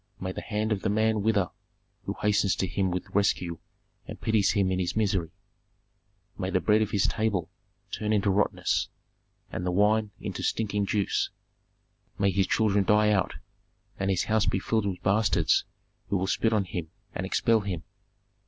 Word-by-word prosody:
May 95 0 -3
the - - -6
hand 110 0 -2
of 100 -3 0
the - - 0
man 110 +1 +2
wither 100 -4 +1 0.5
who - - -3
hastens 105 -2 +3
to - - 0
him 95 +1 0
with 90 0 -4
rescue 90 -4 +1 0.5
and - - -8
pities 110 -3 +2
him 100 -3 +2
in 95 - 0
his 90 -2 -1
misery! 100 -6 +1 1.1
May 95 -1 -1
the 95 - +2
bread 105 +3 +3
on 110 - +2
his 100 -1 +1
table 105 -5 -1 0.4
turn 105 0 -2
into 100 -2 +2
rottenness, 100 +2 +1 0.6
and 90 - -4
the 90 - 0
wine 105 +3 +3
into - - -5
stinking 105 -2 0
juice! 100 0 0 0.9
May 100 -1 +2
his 95 +1 +1
children 105 -2 +2
die 105 +1 +4
out, 95 -3 +1 0.6
and 95 0 0
his 95 -2 +2
house 110 -1 +1
be - - +2
filled 110 +2 0
with 95 -2 -4
bastards 100 -5 +3 0.4
who 100 - +1
will 95 - -1
spit 110 +3 +1
on 105 -3 +2
him 85 -2 -5 0.2
and - - -3
expel 110 +4 +2
him! 95 -5 -4
100 Hz, 175 wpm, -27 LUFS, 95-105 Hz, 1.1 s, die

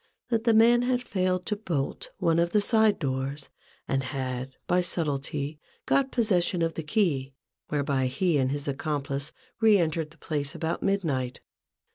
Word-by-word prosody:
that 230 -1 0
the 230 - +5
man 235 +2 +6
had 245 0 0
failed 185 -2 0
to 210 - -1
bolt 180 - -3
one 165 0 +2
of 170 0 +1
the 210 - +5
side 220 0 +4
doors, 135 0 -3 0.4
and 135 0 +1
had, 130 -1 -4
by 180 +1 +3
subtilty, 150 -3 -2 0.3
got 270 -1 +2
possession 185 -7 +2
of 165 0 0
the - - -4
key, 150 - 0 0.3
whereby 140 -3 0
he 150 +4 +1
and 130 0 +1
his 145 0 -3
accomplice 140 0 -2 0.3
re 220 -2 +6
entered 160 -3 0
the 155 - -20
place 145 -2 -3
about 165 0 -2
midnight. 150 -11 -1
160 Hz, 160 wpm, -27 LUFS, 140-200 Hz, 0.4 s, man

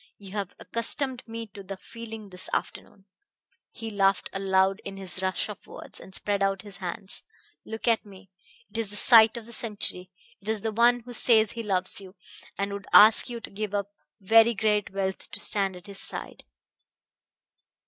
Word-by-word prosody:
You 195 -2 -12
have 200 -2 -4
accustomed 255 +2 -1
me 230 0 -6
to 200 - -9
the 195 0 -7
feeling 225 -1 -9
this 180 0 -2
afternoon." 195 -2 -4 0.6
He 225 -1 -7
laughed 195 -2 +1
aloud 195 0 +2
in 195 -1 -7
his 190 -1 +1
rush 185 0 -1
of 210 - -10
words, - - -8
and 190 - -8
spread 205 -1 +1
out 195 0 0
his 200 -3 -10
hands. 190 +1 -3 0.4
"Look 220 +1 -6
at 230 -1 +3
me! 195 -2 -15 0.4
It 230 - -4
is 225 -3 0
the 205 - -2
sight 225 +1 +7
of 230 - -8
the 235 - -7
century! 205 -5 -1 0.3
It 205 - -7
is 220 -2 -1
the 220 - -2
one 240 +2 +4
who 245 +1 -10
says 220 -2 +4
he 235 - -5
loves 190 -2 -1
you, 190 0 -13 0.4
and 200 0 -2
would 200 -1 -7
ask 220 +4 +7
you 240 -1 -5
to - - -9
give 205 0 -4
up 200 0 -2 0.3
very 225 +3 +5
great 210 0 +1
wealth 190 -1 -3
to - - -7
stand 195 -2 0
at 180 - -12
his 200 -1 -7
side." - - -5
205 Hz, 190 wpm, -27 LUFS, 195-225 Hz, 0.6 s, sight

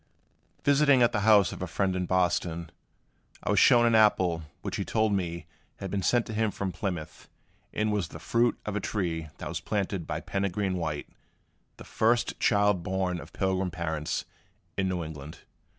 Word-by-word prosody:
Visiting 140 -2 +5
at 120 - +4
the - - 0
house 105 -2 +5
of - - -8
a 90 - -2
friend 95 +3 0
in 90 -1 -2
Boston, 85 -2 0 0.7
I - - 0
was - - +4
shown 120 -1 +6
an 115 - +3
apple 95 -6 +4 0.2
which - - -3
he - - -1
told 110 -2 +1
me 85 -4 -2 0.3
had 95 -2 -6
been 100 - -1
sent 120 +5 +2
to 110 - -6
him 110 0 +1
from 100 -1 -3
Plymouth, 85 -3 -5 0.4
and 105 0 0
was 100 -5 0
the - - -10
fruit 115 +8 +1
of 105 - -3
a - - +1
tree 85 -7 -2
that - - -6
was - - -3
planted 100 -4 -2
by - - -2
Peregrine 95 0 -1
White, 80 -5 -3 0.7
the - - -10
first 115 +2 +1
child 105 -3 +3
born 90 0 -1
of 80 +1 -11
Pilgrim 95 -1 0
parents 80 -3 -3 0.5
in 95 -1 0
New 90 -2 -2
England. 75 -1 -9
95 Hz, 180 wpm, -28 LUFS, 85-105 Hz, 0.7 s, shown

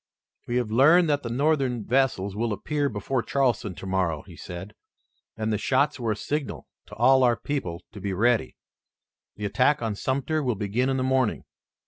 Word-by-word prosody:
"We 120 - -2
have 120 -3 0
learned 160 +9 +6
that 145 0 +1
the 115 - -5
Northern 130 -3 0
vessels 115 -6 +1
will 115 0 -1
appear 145 +6 -1
before 115 +4 -2
Charleston 120 -8 0
tomorrow," 95 -5 -1
he - - -13
said, 90 +4 -8 0.6
"and 110 0 -1
the 105 - -1
shots 140 +5 +1
were 115 -3 0
a - - -6
signal 145 +6 -4 0.2
to - - -11
all 130 +3 +5
our 120 -2 +3
people 100 -10 -4
to 105 - -10
be 100 +1 -2
ready. 115 +5 +1 0.8
The 105 - -5
attack 130 +5 +2
on 110 -2 -1
Sumter 140 +8 -1
will 125 -5 0
begin 105 +6 -1
in 135 - 0
the 130 - 0
morning. 130 -3 +1
120 Hz, 180 wpm, -26 LUFS, 105-135 Hz, 0.8 s, learned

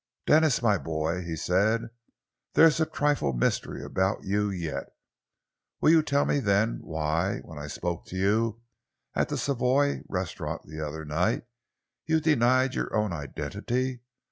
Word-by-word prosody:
"Denis, 155 -5 +4
my 105 -4 +3
boy," 80 +2 -2
he 85 -2 -4
said, 105 +8 +1 0.6
"there's 165 -1 +6
a 160 - +2
trifle 145 - +1
of 65 - -2
mystery - - -1
about 95 +2 -1
you 105 +1 0
yet. 80 -8 -3 0.9
Will 155 - +5
you 165 -1 +6
tell 140 -2 +1
me 145 - +1
then, 105 -1 +1
why, 80 +4 -1
when 80 -3 -10
I 75 - -6
spoke 85 +3 -4
to - - -8
you 110 +4 +1 0.5
at - - 0
the - - -2
Savoy 140 +1 +1
Restaurant 90 -2 -3
the 80 +1 -7
other 80 +1 -5
night, 80 +5 0 0.6
you 160 0 +3
denied 130 -4 +3
your - - -2
own 105 -4 +1
identity? 120 - -3
100 Hz, 150 wpm, -27 LUFS, 85-130 Hz, 0.9 s, there's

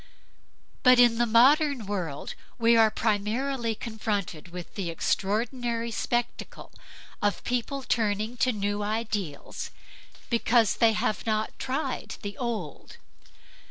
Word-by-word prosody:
But 255 -1 +7
in 240 -1 +5
the 240 - +3
modern 265 +2 +4
world 180 -8 -4 0.2
we 230 0 +4
are 225 -1 +6
primarily 225 +3 -1
confronted 210 -7 -3
with 175 0 -9
the 190 -4 -3
extraordinary 230 +7 -1
spectacle 240 +1 -3 0.5
of 205 -1 0
people 250 +3 -2
turning 220 -1 0
to 255 +2 +2
new 205 -1 -2
ideals 210 -7 -3 0.6
because 230 -1 +3
they 230 -2 +5
have 215 +1 -1
not 215 0 0
tried 270 +4 -3
the 205 0 -5
old. 225 - -5
225 Hz, 115 wpm, -27 LUFS, 205-240 Hz, 0.6 s, But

